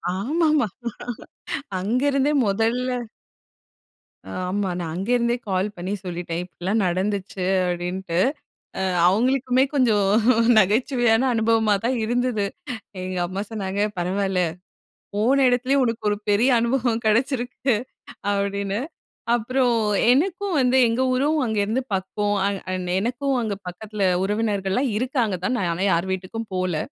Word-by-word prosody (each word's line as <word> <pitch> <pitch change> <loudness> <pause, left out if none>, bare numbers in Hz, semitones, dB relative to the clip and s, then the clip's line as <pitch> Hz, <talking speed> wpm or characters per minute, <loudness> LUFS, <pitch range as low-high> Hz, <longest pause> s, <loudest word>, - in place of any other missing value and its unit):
ஆமாமா. 305 - +1 1.1
அங்க 220 +7 0
இருந்தே 275 +2 +2
மொதல்ல. 225 +5 0 1.5
ஆமா. 195 +1 -1
நான் 165 -2 -4
அங்கேருந்தே 235 +5 +1
கால் 190 +1 +1
பண்ணி 185 +3 -3
சொல்லிட்டேன் 175 -1 -4
"இப்டிலாம் 190 +4 -2
நடந்துச்சு" 190 +1 -2 0.2
அப்டின்ட்டு. 175 0 -2 0.6
அ - - -1 0.3
அவங்களுக்குமே 255 +5 +2
கொஞ்சம் 220 -8 +3 0.5
நகைச்சுவையான 225 +3 +3
அனுபவமா 225 -1 +2
தான் 255 +2 +1
இருந்தது. 240 -2 0 0.6
எங்க 185 0 -4
அம்மா 190 +2 -4
சொன்னாங்க 200 -2 -3 0.2
"பரவாயில்ல 190 +1 0 0.7
போன 255 +7 +3
எடத்துலேயே 255 +3 +2
உனக்கு 230 -2 -2
ஒரு 205 - 0
பெரிய 225 +6 +4
அனுபவம் 235 -1 0
கெடைச்சிருக்கு!" 245 +2 +1 0.6
அப்படின்னு. 200 +1 -1 0.6
அப்புறம் 245 +1 +1 0.3
எனக்கும் 360 +7 +1
வந்து 255 0 +3
எங்க 230 +3 0
ஊரும் 290 +5 +1
அங்கே 220 -3 -1
இருந்து 235 +5 0
பக்கம். 205 +2 -1
அண்ட் 200 -1 -2
அண்ட் 180 -1 -3
எனக்கும் 255 +6 -1
அங்கே 210 -3 -2
பக்கத்ல 205 +3 -5 0.2
உறவினர்கள்லாம் 205 +3 0
இருக்காங்க 245 -4 0
தான். 255 - +1
நான் 185 -5 0
ஆனா 185 +4 -1
யாரு 170 +2 +1
வீட்டுக்கும் 200 +4 -5
போகல. 185 -3 0
220 Hz, 120 wpm, -23 LUFS, 190-250 Hz, 1.5 s, பெரிய